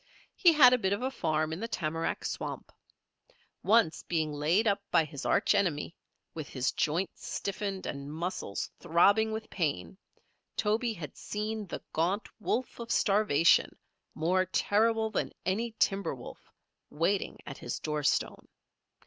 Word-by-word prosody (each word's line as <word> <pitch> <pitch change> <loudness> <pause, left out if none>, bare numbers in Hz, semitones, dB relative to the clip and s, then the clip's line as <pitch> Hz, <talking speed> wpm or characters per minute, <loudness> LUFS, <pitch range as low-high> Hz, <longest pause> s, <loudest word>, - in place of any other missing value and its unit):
He 345 - +6
had 255 -5 +8
a 250 - +3
bit 190 -2 +1
of 205 - -3
a 260 - -1
farm 155 -8 -1
in 160 - -5
the 230 - -3
tamarack 165 -6 -2
swamp. - - -5 0.9
Once, 210 -5 +3
being 160 -3 -1
laid 165 +10 +2
up 200 -1 +2
by 160 - +4
his 145 -2 -6
arch - - +3
enemy, 175 -6 0 0.4
with 155 -4 -6
his 130 0 -1
joints 170 +5 -2
stiffened 195 -1 -3
and 140 0 -5
muscles 165 - -4
throbbing 200 +6 +4
with 220 0 -4
pain, 140 - -2 0.6
Toby 225 +3 +1
had 150 -8 -8
seen 210 0 -4
the - - -6
gaunt 180 +6 0
wolf 240 +4 -2
of 235 0 -6
starvation, 195 -7 +3 0.4
more 180 +4 +2
terrible 220 +3 +2
than - - -2
any 220 +5 -1
timber 195 -6 +1
wolf, 125 - -12 0.4
waiting 185 +6 0
at 135 - -8
his 120 - -4
doorstone. 150 -2 -1
190 Hz, 145 wpm, -30 LUFS, 155-215 Hz, 0.9 s, had